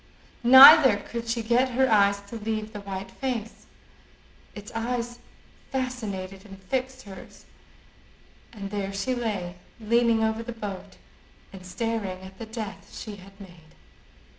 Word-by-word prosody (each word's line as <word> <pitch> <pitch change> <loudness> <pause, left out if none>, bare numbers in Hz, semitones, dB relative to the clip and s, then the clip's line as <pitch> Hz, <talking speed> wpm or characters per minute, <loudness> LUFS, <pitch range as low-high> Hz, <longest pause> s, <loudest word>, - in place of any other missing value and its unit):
Neither 260 -1 +9
could 235 +3 -7
she 230 0 -2
get 245 +3 +1
her 265 0 +4
eyes 200 -2 +3
to 200 +3 -11
leave 215 0 -4
the 205 - -7
white 195 -1 -7
face: 240 -3 -5 0.9
its 205 -1 -10
eyes 240 +1 -4 0.5
fascinated 205 -8 -4
and 195 -2 -12
fixed 260 +6 -4
hers; 195 -2 -13 1.1
and 200 -4 -8
there 200 -1 -4
she 195 +6 -2
lay 200 -7 -4 0.2
leaning 230 0 +2
over 220 +1 -1
the 240 +1 -7
boat 205 -4 -8 0.6
and 190 -1 -11
staring 200 -1 -4
at 190 0 -13
the 225 - -7
death 215 -3 -8
she 210 -2 -8
had 195 +1 -16
made. 175 -5 -15
215 Hz, 140 wpm, -25 LUFS, 195-235 Hz, 1.1 s, Neither